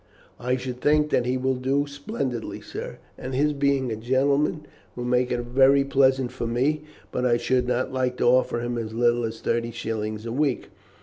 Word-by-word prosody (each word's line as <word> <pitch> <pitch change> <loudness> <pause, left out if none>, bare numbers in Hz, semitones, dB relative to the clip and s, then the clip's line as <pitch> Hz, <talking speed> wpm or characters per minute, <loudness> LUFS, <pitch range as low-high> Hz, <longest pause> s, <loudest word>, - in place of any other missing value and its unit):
"I 125 +1 0
should 125 -1 -6
think 150 0 +3
that 125 - +2
he 130 +1 +1
will 130 +1 +1
do 135 +3 0
splendidly, 140 -4 -4
sir, - - -7 0.2
and 130 0 -5
his 150 +3 +2
being 140 -3 +1
a - - -1
gentleman 140 +6 +1 0.3
will 120 - -4
make 125 0 +1
it 120 - 0
very 135 +3 +4
pleasant 135 -2 +2
for 120 -2 -4
me. 140 +6 0 0.3
But 125 - -2
I 120 -2 +3
should 125 +1 +1
not 125 +1 -1
like 130 -1 -1
to - - 0
offer 120 -1 +3
him 120 0 -2
as 110 -1 -5
little 120 0 +2
as 110 0 -6
thirty 115 0 0
shillings 110 -2 -4
a 115 - -4
week." 135 0 0
125 Hz, 195 wpm, -25 LUFS, 120-135 Hz, 0.3 s, very